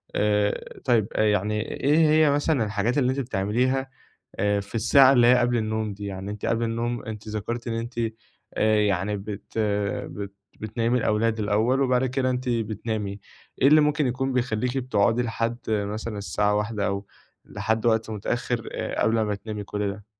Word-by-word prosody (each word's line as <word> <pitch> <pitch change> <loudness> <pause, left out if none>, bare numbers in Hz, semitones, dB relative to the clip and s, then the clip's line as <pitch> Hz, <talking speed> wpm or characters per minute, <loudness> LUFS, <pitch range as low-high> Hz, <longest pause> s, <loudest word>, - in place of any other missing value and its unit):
آآ 105 0 0
طيّب 115 -5 +3
يعني 105 0 +1 0.2
إيه 145 +3 +4
هي 155 -1 +5
مثلًا 145 -3 +1
الحاجات 105 +5 -1
اللي 130 -2 +3
أنتِ 135 - -2
بتعمليها 130 +3 0 0.5
آآ، 105 0 +1
في 100 +3 -9
الساعة 130 +4 +6
اللي 120 -2 +5
هي 125 - +7
قبل 120 0 +2
النوم 110 -1 -2
دي؟ 100 +1 -8
يعني 95 +1 -5
أنتِ 105 - -6
قبل 115 0 0
النوم 115 +1 -2
أنتِ 110 -1 -7
ذكرتِ 115 +3 -4
إن 115 - -1
أنتِ 115 +2 -4 0.6
يعني 105 -2 +2
بت 105 +2 -6 0.5
بت 100 -1 -7 0.3
بتنيمي 115 +3 0
الأولاد 110 +1 +1
الأوّل 110 +6 +1
وبعد 130 -1 +2
كده 130 0 0
أنتِ 125 0 -2
بتنامي، 110 -2 -2 0.4
إيه 135 - +6
اللي 155 +1 +7
ممكن 150 -1 +2
يكون 130 +1 -1
بيخليكِ 125 +1 -1
بتقعدي 120 -2 +2
لحد 115 0 -2
مثلًا 105 +1 -2
الساعة 105 +1 0
01:00 105 0 -1
أو 100 0 -3 0.4
لحد 110 +1 -2
وقت 110 -1 +2
متأخّر 115 +2 -2 0.3
قبل 110 0 +2
ما 105 -1 0
تنامي 105 0 -6
كل 105 0 -2
ده؟ 105 0 -11
110 Hz, 165 wpm, -25 LUFS, 105-125 Hz, 0.6 s, هي